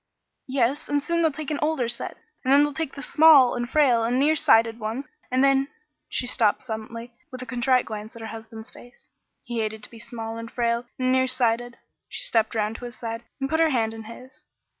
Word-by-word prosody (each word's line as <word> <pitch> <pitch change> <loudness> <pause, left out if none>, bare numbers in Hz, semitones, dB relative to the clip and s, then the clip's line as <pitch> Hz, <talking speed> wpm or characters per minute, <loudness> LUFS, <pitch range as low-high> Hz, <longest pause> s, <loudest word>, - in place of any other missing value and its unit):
"Yes, 265 +2 0
and 290 -1 +1
soon 335 +2 0
they'll 320 -1 +3
take 305 +1 -6
an 295 - -1
older 300 -5 +1
set, 235 0 -5 0.3
and 260 - +1
then 285 +1 +7
they'll 295 0 -1
take 320 -1 -4
the 280 - -6
small 300 -6 +6
and 240 0 -3
frail 260 -7 +4
and 240 +2 +1
near 295 +4 +3
sighted 230 -7 +4
ones, 230 +6 -4 0.2
and 255 +1 +2
then 275 0 +4 0.2
" 300 - -54
She - - -2
stopped 230 -4 +1
suddenly, 230 0 -7 0.2
with 255 0 -7
a - - -8
contrite 250 +1 +1
glance 215 0 -7
at 230 - -10
her 220 - -6
husband's 225 0 -9
face. 245 0 -17 0.3
He 240 -2 -4
hated 220 -1 -3
to - - -8
be 230 - -12
small 225 -2 -6
and 230 0 -7
frail 235 0 0
and 255 0 +1
near 260 0 +3
sighted. 240 -1 0 0.3
She - - -5
stepped 225 -1 +1
round 215 +1 -1
to 245 - -8
his 240 -1 -8
side 230 0 -5 0.2
and 270 - -1
put 320 +3 0
her 325 -1 +4
hand 225 -5 0
in 225 -1 -9
his. 255 +4 -12
245 Hz, 225 wpm, -25 LUFS, 225-275 Hz, 0.3 s, then